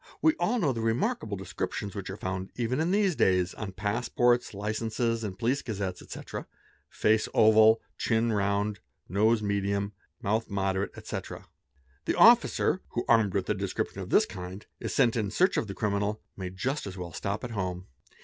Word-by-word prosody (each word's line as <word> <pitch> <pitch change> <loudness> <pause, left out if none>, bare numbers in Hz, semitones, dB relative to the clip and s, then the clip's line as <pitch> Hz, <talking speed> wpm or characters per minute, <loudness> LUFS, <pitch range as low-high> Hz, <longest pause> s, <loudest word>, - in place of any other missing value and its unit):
We 315 - +4
all 210 +8 +1
know 155 - +1
the 115 - -3
remarkable 115 - 0
descriptions 95 +2 -4
which 100 -2 -6
are 95 - -5
found, 95 -1 -4
even 125 +2 -1
in 160 +2 +1
these 195 -2 +2
days, 90 -5 +2
on 105 -4 -6
passports, 120 +4 +1
_ - - -17
licenses, 110 +2 -1
in 100 -3 -4
police 120 +7 0
gazettes, 100 -5 -4
etc.: - - -7 0.4
face 110 0 +2
oval, 110 +1 +6 0.2
chin 115 0 +1
round, 100 0 0 0.3
nose 110 +4 +2
medium, 100 0 -1 0.3
"mouth 110 +3 -1
moderate, 95 -1 0
etc. - - -6 0.6
The - - 0
officer, 225 -6 +5
who, 120 - -1
armed 110 -5 +4
with - - 0
a - - +2
description - - -3
of - - -7
this - - +5
kind, 90 +3 -8
is - - -4
sent 125 -4 +3
in 110 -4 0
search 185 - +2
of 105 - -1
a 100 - -5
criminal, 105 0 -1 0.2
may 95 -2 -5
just 130 +9 -3
as 95 -1 -7
well 85 -2 -6
stop 100 +2 -3
at 125 - -5
home. 90 -4 -3
105 Hz, 180 wpm, -28 LUFS, 100-115 Hz, 0.6 s, oval